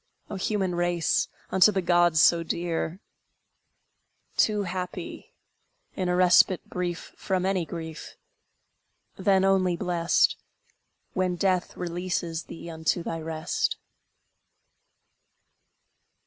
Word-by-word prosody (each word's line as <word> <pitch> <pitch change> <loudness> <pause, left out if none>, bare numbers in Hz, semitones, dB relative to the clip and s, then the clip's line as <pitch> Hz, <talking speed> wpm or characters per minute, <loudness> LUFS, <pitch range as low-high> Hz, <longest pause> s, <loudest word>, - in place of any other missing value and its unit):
O - - -3
human 190 -1 -1
race, 175 -1 +1 0.2
unto 190 +3 +6
the 195 - 0
gods 175 -2 +3
so 170 +1 +5
dear! 170 +1 -3 1.4
Too 210 -2 +2
happy, 180 -1 -6 0.6
in 185 -2 -1
a 180 - +2
respite 180 0 +4
brief 180 -1 -4
From 185 -2 -1
any 190 -3 0
grief! 160 -2 -7 1.0
Then 190 0 +3
only 185 -2 +2
blessed, 170 -1 +2 0.8
When 185 -1 0
Death 185 0 0
releases 175 -1 -3
thee 170 - -9
unto 160 +1 -1
thy 165 -1 -4
rest! 160 +1 -2
175 Hz, 100 wpm, -26 LUFS, 170-185 Hz, 1.4 s, unto